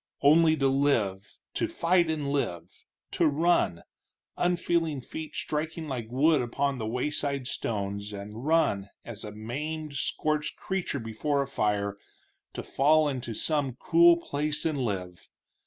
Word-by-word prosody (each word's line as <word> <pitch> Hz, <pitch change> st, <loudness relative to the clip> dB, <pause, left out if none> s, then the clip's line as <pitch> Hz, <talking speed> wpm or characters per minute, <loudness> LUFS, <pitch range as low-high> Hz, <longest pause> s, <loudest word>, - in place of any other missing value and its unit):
Only 160 Hz, +2 st, +6 dB
to 135 Hz, -, +2 dB
live, 115 Hz, -9 st, +1 dB, 0.2 s
to -, -, 0 dB
fight 170 Hz, 0 st, +2 dB
and 150 Hz, -3 st, -1 dB
live, 90 Hz, -, -3 dB, 0.3 s
to 165 Hz, -, +3 dB
run, 150 Hz, -, +2 dB, 0.5 s
unfeeling 170 Hz, -4 st, +1 dB
feet 155 Hz, +4 st, -7 dB
striking 155 Hz, +1 st, -3 dB
like 125 Hz, -5 st, -4 dB
wood 145 Hz, +4 st, +3 dB
upon 135 Hz, +2 st, -1 dB
the 110 Hz, -, -3 dB
wayside 140 Hz, +2 st, -1 dB
stones, 100 Hz, -3 st, -3 dB
and 105 Hz, +3 st, -7 dB
run, 140 Hz, -11 st, +2 dB, 0.2 s
as 110 Hz, -3 st, -8 dB
a 105 Hz, -, -6 dB
maimed, 150 Hz, +8 st, -5 dB
scorched 150 Hz, +2 st, -1 dB
creature 190 Hz, -7 st, -2 dB
before 140 Hz, +6 st, -1 dB
a -, -, -8 dB
fire, 100 Hz, -5 st, -1 dB, 0.5 s
to -, -, -5 dB
fall 155 Hz, +3 st, +3 dB
into 125 Hz, -5 st, -3 dB
some 145 Hz, -2 st, 0 dB
cool 170 Hz, +3 st, +5 dB
place 150 Hz, -2 st, -2 dB
and 155 Hz, -3 st, 0 dB
live. 90 Hz, -5 st, -4 dB
140 Hz, 140 wpm, -28 LUFS, 110-155 Hz, 0.5 s, Only